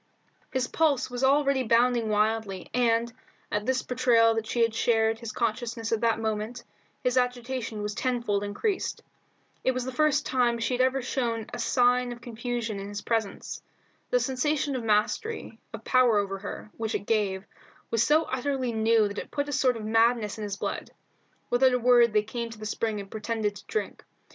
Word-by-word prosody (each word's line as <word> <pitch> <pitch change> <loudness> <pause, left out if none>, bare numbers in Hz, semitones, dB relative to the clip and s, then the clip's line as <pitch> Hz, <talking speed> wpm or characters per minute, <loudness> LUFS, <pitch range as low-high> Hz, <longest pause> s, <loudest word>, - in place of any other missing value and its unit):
His 255 -1 0
pulses 285 -6 +1
were 265 - +5
already 275 -1 +3
bounding 235 -1 +3
wildly, 210 -2 0
and, 235 -1 +2 0.4
at 210 +2 -1
this 260 0 +1
betrayal 240 -2 +3
that 225 -1 -3
she 235 - -1
had 230 -1 +1
shared 225 -1 +2
his 230 -2 -6
consciousness 230 0 -2
at 225 -1 +1
that 230 -1 +2
moment, 220 +2 -3 0.4
his 250 0 +1
agitation 245 -3 -3
was 210 0 -2
tenfold 235 -5 -1
increased. 370 - -2 0.6
It 260 - +2
was 255 -1 -3
the 260 - -3
first 300 +1 +2
time 245 -2 +2
she 230 +2 -1
had 250 - +1
ever 260 0 +2
shown 235 -4 -1
a 245 - -4
sign 245 +1 +2
of 240 - -7
confusion 235 -2 -4
in 200 +1 -6
his 205 0 -6
presence. 225 -3 -2 0.5
The - - +3
sensation 285 - 0
of 250 - -3
mastery, 220 - 0
of - - -8
power 250 -4 +4
over 195 -1 -1
her, 205 +1 -7
which 225 -1 -2
it - - -3
gave, 200 -4 0 0.5
was 230 - +2
so 305 +6 +4
utterly 260 -2 -2
new 220 -1 +3
that 205 0 -5
it - - -7
put 285 0 -2
a - - -3
sort 255 -2 +2
of 215 - -6
madness 225 -1 +2
in - - -4
his 200 -1 -4
blood. - - -4 0.6
Without 255 +1 +4
a - - +3
word 240 -1 +5
they 210 0 +3
came 235 +2 -4
to 225 - -10
the 215 - -8
spring 215 0 -2
and 195 -1 -9
pretended 215 -1 -2
to - - -14
drink. 435 - -3
235 Hz, 190 wpm, -27 LUFS, 220-255 Hz, 0.6 s, were